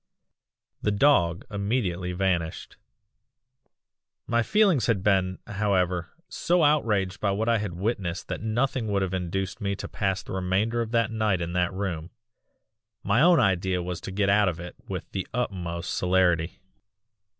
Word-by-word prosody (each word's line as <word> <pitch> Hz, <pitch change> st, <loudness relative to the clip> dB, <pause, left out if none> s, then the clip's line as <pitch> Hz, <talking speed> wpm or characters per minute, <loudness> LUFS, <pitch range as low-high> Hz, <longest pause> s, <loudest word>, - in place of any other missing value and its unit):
"The -, -, +1 dB
dog 100 Hz, -, +3 dB
immediately 100 Hz, -4 st, -1 dB
vanished. 90 Hz, -3 st, -2 dB, 1.5 s
"My 120 Hz, 0 st, +2 dB
feelings 195 Hz, -, +3 dB
had 105 Hz, -6 st, +1 dB
been, 95 Hz, -2 st, +2 dB
however, 95 Hz, -4 st, 0 dB, 0.2 s
so 175 Hz, -1 st, +1 dB
outraged 105 Hz, -10 st, +2 dB
by 100 Hz, -, 0 dB
what 105 Hz, +3 st, -1 dB
I 115 Hz, -1 st, +3 dB
had 100 Hz, -4 st, -4 dB
witnessed 95 Hz, -2 st, -2 dB
that -, -, -4 dB
nothing 120 Hz, +2 st, 0 dB
would 100 Hz, -2 st, +1 dB
have 95 Hz, -1 st, -3 dB
induced 95 Hz, +3 st, -3 dB
me 100 Hz, -1 st, -1 dB
to -, -, -6 dB
pass 95 Hz, -2 st, -2 dB
the -, -, -10 dB
remainder 95 Hz, +5 st, 0 dB
of 115 Hz, -, -3 dB
the 115 Hz, 0 st, +2 dB
night 110 Hz, -3 st, 0 dB
in 85 Hz, 0 st, -3 dB
that 90 Hz, -1 st, +1 dB
room 95 Hz, -4 st, -4 dB, 0.9 s
my 110 Hz, +5 st, +2 dB
own 175 Hz, +1 st, +6 dB
idea 95 Hz, -1 st, +1 dB
was 90 Hz, 0 st, -5 dB
to 95 Hz, -, -6 dB
get 100 Hz, +1 st, 0 dB
out 100 Hz, 0 st, +4 dB
of 85 Hz, -1 st, -5 dB
it 90 Hz, 0 st, -8 dB
with -, -, -5 dB
the 95 Hz, -, -3 dB
utmost 90 Hz, -8 st, -3 dB
celerity. 90 Hz, 0 st, +1 dB
95 Hz, 155 wpm, -26 LUFS, 90-110 Hz, 1.5 s, own